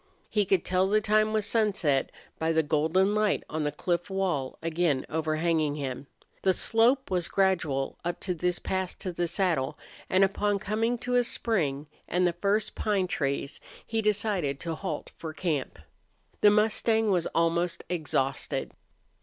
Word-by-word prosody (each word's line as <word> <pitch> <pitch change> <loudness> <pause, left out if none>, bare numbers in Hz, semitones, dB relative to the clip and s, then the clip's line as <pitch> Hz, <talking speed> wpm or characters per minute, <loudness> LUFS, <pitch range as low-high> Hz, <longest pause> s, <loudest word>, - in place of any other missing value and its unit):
He 210 -2 +2
could 185 -2 +1
tell 185 +1 +2
the 215 +1 +4
time 215 +1 +2
was 215 -2 0
sunset 195 - +1 0.3
by 160 0 +1
the 160 0 +3
golden 160 +7 +2
light 215 -1 +1
on 155 0 -3
the 150 - 0
cliff 175 +4 -2
wall 180 -9 -1
again 165 -4 0
overhanging 155 -1 0
him. 135 -1 -5 0.3
The 190 -1 +3
slope 240 +2 +3
was 175 -2 +1
gradual 175 -9 0
up 175 0 -3
to 185 - -1
this 180 +1 -1
pass 190 -1 -3
to 185 - -5
the 175 0 -1
saddle, 165 -6 0 0.3
and 185 +1 +4
upon 205 +1 +1
coming 220 +4 -1
to 250 0 +2
a 245 - +4
spring 155 -13 -1 0.2
and 180 +2 +1
the 175 - +2
first 200 +4 0
pine 205 -3 0
trees, 140 -5 -2 0.3
he 225 -1 -1
decided 205 -9 0
to 165 -1 -3
halt 185 +4 -5
for 160 -1 -6
camp. 155 -4 -2 0.6
The 210 - +7
mustang 220 +1 +2
was 175 -3 +1
almost 170 +1 0
exhausted. 140 -6 -1
180 Hz, 160 wpm, -28 LUFS, 155-205 Hz, 0.6 s, The